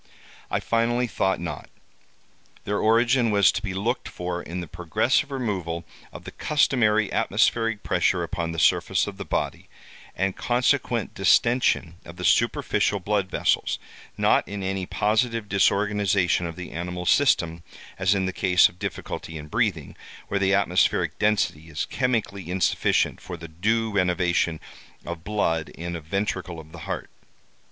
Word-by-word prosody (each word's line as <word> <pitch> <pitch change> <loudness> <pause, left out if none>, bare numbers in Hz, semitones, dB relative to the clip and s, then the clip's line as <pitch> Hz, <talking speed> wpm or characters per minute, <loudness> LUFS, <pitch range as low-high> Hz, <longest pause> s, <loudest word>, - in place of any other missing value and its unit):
I - - 0
finally 120 +2 +1
thought 95 -4 0
not. 85 - -6 0.9
Their 105 0 -1
origin 120 +2 +3
was 100 -2 +5
to - - -3
be 100 -3 -4
looked 115 +6 -2
for 90 0 -4
in 90 +2 -6
the 85 - -5
progressive 110 - 0
removal 95 - -3 0.3
of - - -10
the - - -8
customary 110 -8 +2
atmospheric 115 -2 +1
pressure 90 -2 +1
upon 85 -1 -3
the 85 - -6
surface - - +3
of - - -7
the - - -6
body, - - -3 0.5
and 95 +1 -1
consequent 120 -2 0
distention 95 -4 +2
of - - -11
the - - -5
superficial 100 - +2
blood 100 0 -1
vessels—not - - 0
in 100 +1 -5
any 95 -1 -2
positive 110 +1 0
disorganization 100 -2 +2
of 80 - -7
the 90 +1 -8
animal 90 +1 -5
system, 85 -11 +3 0.4
as 95 +1 +3
in 95 -1 0
the 95 - -2
case 90 -2 +4
of 90 - -20
difficulty 80 -2 -5
in 75 0 -9
breathing, - - -1 0.3
where 100 - 0
the 100 0 +3
atmospheric 95 -2 +1
density 90 -7 0
is 75 -3 -3
chemically 105 -8 -2
insufficient 90 0 +1
for 90 - -7
the 85 0 -9
due 110 +7 0
renovation 90 -4 +1 0.5
of 85 -1 -6
blood 80 -6 -1
in 85 +1 -6
a 85 - -5
ventricle 90 0 -3
of 80 0 -13
the 85 - -10
heart. - - -4
95 Hz, 150 wpm, -25 LUFS, 85-110 Hz, 0.9 s, was